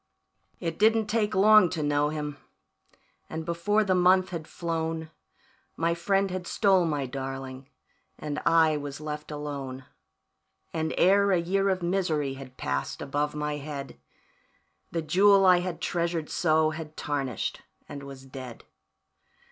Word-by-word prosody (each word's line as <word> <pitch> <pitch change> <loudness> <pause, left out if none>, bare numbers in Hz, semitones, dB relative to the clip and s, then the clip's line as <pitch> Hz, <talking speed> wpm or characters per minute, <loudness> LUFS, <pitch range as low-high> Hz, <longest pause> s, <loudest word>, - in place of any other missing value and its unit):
"It 165 -2 -4
didn't 220 +1 +4
take 210 -1 0
long 210 -1 +7
to 160 -3 -3
know 145 0 +2
him, 150 -1 -4 0.9
and 160 0 -5
before 190 +6 +1
the 190 -2 +1
month 185 +1 +4
had 165 -3 -6
flown 160 -1 -3 0.7
My 165 +1 +1
friend 195 +3 +1
had 180 -1 -4
stole 190 -4 +3
my 145 -4 -1
darling, 135 0 -6 0.5
and 150 -1 -4
I 160 -2 +4
was 145 -1 -6
left 150 0 -6
alone; 140 -3 -6 0.9
And 160 -1 -1
ere 200 +2 +4
a 185 - +4
year 195 +3 +1
of 185 -2 -1
misery 170 -6 0
had 135 -1 -11
passed 70 0 -3
above 145 +2 -2
my 150 0 -2
head, 140 - -7 0.9
The 165 -1 -2
jewel 195 +5 +5
I 180 -1 +6
had 175 -1 -4
treasured 170 -2 -1
so 155 -2 +2
had 155 -1 -8
tarnished 135 -6 -3 0.3
and 145 -1 -7
was 135 -1 -10
dead. 130 -3 -9
160 Hz, 140 wpm, -27 LUFS, 145-180 Hz, 0.9 s, long